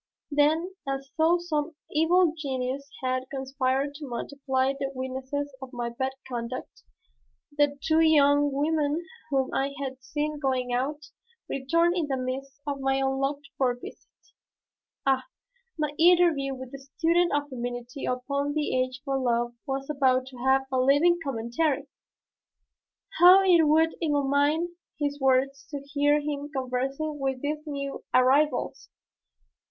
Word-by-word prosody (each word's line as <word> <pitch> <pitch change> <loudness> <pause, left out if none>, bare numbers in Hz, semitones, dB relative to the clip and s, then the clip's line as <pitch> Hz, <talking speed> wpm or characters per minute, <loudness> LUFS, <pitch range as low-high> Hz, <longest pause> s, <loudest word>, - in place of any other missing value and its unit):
Then, 315 +5 +2 0.2
as 275 0 -4
though 325 +2 +4
some 320 -2 -2 0.2
evil 330 +2 +3
genius 275 -2 -3
had 255 0 -1
conspired 270 +1 -1
to 290 0 -8
multiply 265 +1 -1
the 275 0 -3
witnesses 265 +2 -4
of 265 -1 -8
my 240 -1 -3
bad 260 +3 -2
conduct, 240 0 -6 0.7
the 290 -1 +2
two 320 0 +3
young 290 -2 +5
women 300 +3 0 0.2
whom 270 -2 0
I 275 +1 -1
had 265 -1 -5
seen 300 +2 -3
going 255 -3 -1
out, 290 +5 -2 0.4
returned 335 +6 +1
in 335 -5 0
the 270 -2 -1
midst 265 +2 -5
of 285 -1 -3
my 270 0 +1
unlooked 270 +1 -1
for 250 -2 +2
visit. 245 - -12 1.0
Ah, 265 -1 +2 0.5
my 300 -2 -1
interview 330 -6 +4
with 260 -1 -9
this 275 0 -11
student 345 +1 +3
of 290 0 -1
femininity 245 0 -5
upon 280 +3 -1
the 300 -3 0
Age 255 0 -1
for 270 -1 0
Love 240 -1 0
was 270 0 -3
about 260 -3 +2
to 255 - -13
have 265 +2 +3
a 260 - +1
living 290 +7 +4
commentary! 270 +3 -1 1.3
How 365 +2 +9
it 340 -4 +5
would 320 +2 +4
illumine 295 +3 +1 0.2
his 290 -1 -2
words 270 +1 +1
to 290 -2 -4
hear 290 0 +3
him 290 -1 -4
conversing 270 +3 -2
with 270 -1 -2
these 300 +1 -2
new 280 -1 -4
arrivals! 270 +4 +2
275 Hz, 140 wpm, -27 LUFS, 260-300 Hz, 1.3 s, How